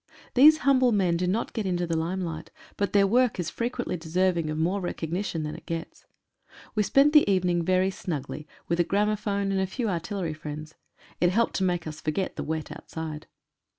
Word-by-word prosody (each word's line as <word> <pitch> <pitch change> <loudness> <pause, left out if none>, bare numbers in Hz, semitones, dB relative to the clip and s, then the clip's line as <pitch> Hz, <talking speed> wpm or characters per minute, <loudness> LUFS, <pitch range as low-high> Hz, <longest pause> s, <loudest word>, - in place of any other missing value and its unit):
These 300 +5 +8
humble 260 -3 +5
men 190 -5 +2
do 180 +1 0
not 210 +6 -1
get 220 -4 -2
into 175 -1 0
the 165 -1 -2
limelight, 165 -1 -3 0.3
but 200 - -1
their 200 -1 +5
work 240 +1 +2
is 175 - -2
frequently 240 -4 -2
deserving 170 0 0
of 155 - -3
more 180 +5 0
recognition 175 -1 -3
than 150 0 -4
it - - -11
gets. 165 0 -6 0.7
We 215 - +1
spent 275 +9 +4
the 300 -9 +6
evening 180 -2 +2
very 185 +2 +2
snugly, 150 -4 -5 0.2
with 170 +1 0
a - - +5
gramo 205 +4 +1
phone 200 -1 -1
and 190 -1 +1
a 190 - 0
few 225 +4 -2
artillery 180 -1 -2
friends. 155 0 -7 0.5
It 175 - +4
helped 225 +5 +1
to 190 - 0
make 175 -2 0
us 155 -1 -7
forget 155 +5 -2
the - - -4
wet 160 -1 -4
outside. 155 -2 -7
180 Hz, 195 wpm, -27 LUFS, 165-205 Hz, 0.7 s, These